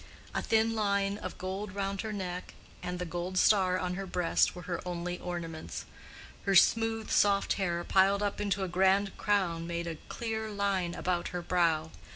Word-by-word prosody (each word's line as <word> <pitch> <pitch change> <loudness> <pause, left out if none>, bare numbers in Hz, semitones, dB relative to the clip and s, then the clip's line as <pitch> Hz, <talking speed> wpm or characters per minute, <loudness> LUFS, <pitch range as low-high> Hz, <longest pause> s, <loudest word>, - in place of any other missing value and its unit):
A - - 0
thin 225 0 +2
line 200 -2 +1
of - - -6
gold 190 +1 -4
round 195 -1 -2
her 220 - -4
neck, 185 -3 -5 0.3
and 180 0 -3
the 180 - -3
gold 175 +2 -4
star 185 -2 +4
on 180 -1 -2
her 195 +1 -4
breast, 180 -1 +2
were 180 - -8
her 175 0 -3
only 175 0 -4
ornaments. 165 -3 -5 0.6
Her 195 - +3
smooth 225 +3 +4
soft 200 -1 +3
hair 175 -3 -1
piled 195 +2 +3
up 205 0 -1
into 200 -1 0
a - - -1
grand 190 +2 +2
crown 175 -5 +1
made 170 0 -3
a 165 -2 -4
clear 220 -2 -3
line 200 -4 0
about 180 -1 -1
her 180 -1 -4
brow. 165 -3 +1
185 Hz, 180 wpm, -31 LUFS, 175-200 Hz, 0.6 s, star